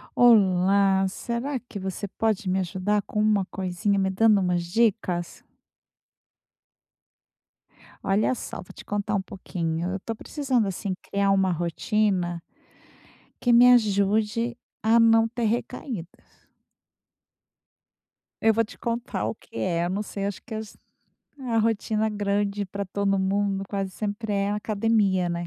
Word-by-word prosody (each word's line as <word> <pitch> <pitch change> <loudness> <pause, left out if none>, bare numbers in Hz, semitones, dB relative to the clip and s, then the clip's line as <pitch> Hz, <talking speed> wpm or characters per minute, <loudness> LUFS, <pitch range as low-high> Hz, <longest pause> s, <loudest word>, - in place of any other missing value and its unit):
Olá, 195 -3 +4
será 240 +7 -3
que 240 -4 -9
você 190 +1 -4
pode 215 -1 -1
me 190 +1 +1
ajudar 190 +3 0
com 210 - -2
uma 210 -2 +2
coisinha, 190 +2 -1
me 190 -1 +1
dando 210 +1 +4
umas 180 -1 0
dicas? 185 -3 0 2.6
Olha 200 +5 +2
só, 250 - -6
vou - - -10
te - - -12
contar 205 0 -2
um 200 - +1
pouquinho. 170 -2 -4
Eu 195 - -3
tô 225 +4 -5
precisando, 260 -3 -1
assim, 195 +1 -3
criar 200 0 0
uma 190 -1 +3
rotina 175 +1 0 1.0
que 245 - +2
me 245 +1 +8
ajude 215 +1 +2 0.3
a 225 +1 +5
não 225 0 +5
ter 235 0 -3
recaídas. 220 - -5 2.0
Eu 225 -1 +4
vou 230 - +3
te 225 - -11
contar 235 +1 -3
o - - -3
que 225 - -10
é, 170 -1 0
não 190 +3 -2
sei, 200 -1 -4
acho 195 -4 -4
que 225 - -8
as 215 -1 -7 0.6
a 245 -4 -1
rotina 220 0 +1
grande 205 0 -1
pra 200 +2 -4
todo 195 +1 0
mundo 195 0 0
quase 195 -2 -2
sempre 210 +2 -3
é 200 0 0
academia, 210 -3 +1
né. 170 0 -3
205 Hz, 135 wpm, -25 LUFS, 190-225 Hz, 2.6 s, me